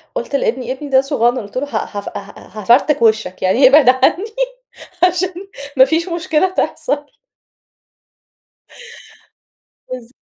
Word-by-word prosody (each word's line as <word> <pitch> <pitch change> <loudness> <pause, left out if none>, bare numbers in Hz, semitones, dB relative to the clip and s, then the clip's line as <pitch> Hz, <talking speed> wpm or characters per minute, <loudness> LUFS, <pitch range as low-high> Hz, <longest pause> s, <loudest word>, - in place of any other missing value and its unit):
قُلت 485 - -3
لابني، 255 -1 -1
ابني 285 +2 -6
ده 265 -1 +4
صغنن 255 -3 0
قُلت 205 +3 -8
له 270 - -1
ه 215 -6 -4
هاف 200 - -5
ها 200 0 -10 0.3
هافرتك 250 +7 +3
وشَّك، 220 -5 +1
يعني 230 +9 +4
إبعد 275 -1 +6
عني 260 +9 +2 0.8
عشان 360 +1 +2 0.4
ما 260 - +8
فيش 330 +5 -1
مشكلة 335 +1 0
تحصل. 290 -5 -2 2.8
بالض 250 -1 -8
265 Hz, 125 wpm, -17 LUFS, 235-310 Hz, 2.8 s, ما